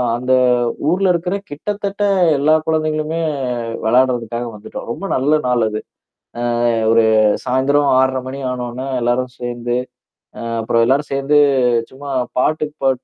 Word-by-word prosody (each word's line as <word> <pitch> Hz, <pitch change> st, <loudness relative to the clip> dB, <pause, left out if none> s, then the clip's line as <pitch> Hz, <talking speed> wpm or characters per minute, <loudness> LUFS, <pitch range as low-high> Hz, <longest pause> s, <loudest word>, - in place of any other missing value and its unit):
அந்த 125 Hz, +2 st, -2 dB, 0.6 s
ஊர்ல 185 Hz, +1 st, +2 dB
இருக்கிற 180 Hz, +2 st, -1 dB
கிட்டத்தட்ட 200 Hz, +6 st, -4 dB, 0.4 s
எல்லா 155 Hz, +3 st, +3 dB
குழந்தைங்களுமே, 155 Hz, 0 st, -1 dB, 0.6 s
விளையாடுறதுக்காக 120 Hz, -1 st, +1 dB
வந்துட்டோம். 105 Hz, -, -9 dB
ரொம்ப 195 Hz, -, -5 dB
நல்ல 150 Hz, +4 st, +2 dB
நாள் 120 Hz, -3 st, +2 dB
அது. 110 Hz, 0 st, -4 dB, 0.9 s
அ -, -, +3 dB, 0.2 s
ஒரு 115 Hz, 0 st, +4 dB, 0.4 s
சாயந்திரம் 135 Hz, +3 st, +2 dB
6:30 130 Hz, 0 st, +1 dB
மணி 135 Hz, +1 st, -6 dB
ஆனோன, 125 Hz, 0 st, -5 dB, 0.2 s
எல்லாரும் 125 Hz, +1 st, 0 dB
சேந்து, 120 Hz, 0 st, -3 dB, 0.6 s
அ -, -, -6 dB, 0.2 s
அப்புறம் 115 Hz, +1 st, +2 dB
எல்லாரும் 140 Hz, +3 st, +1 dB
சேந்து, 140 Hz, +2 st, +2 dB, 0.5 s
சும்மா 140 Hz, +1 st, -8 dB, 0.3 s
பாட்டு 155 Hz, +2 st, +1 dB, 0.2 s
பாட் 130 Hz, -1 st, +1 dB
130 Hz, 125 wpm, -18 LUFS, 120-155 Hz, 0.9 s, ஒரு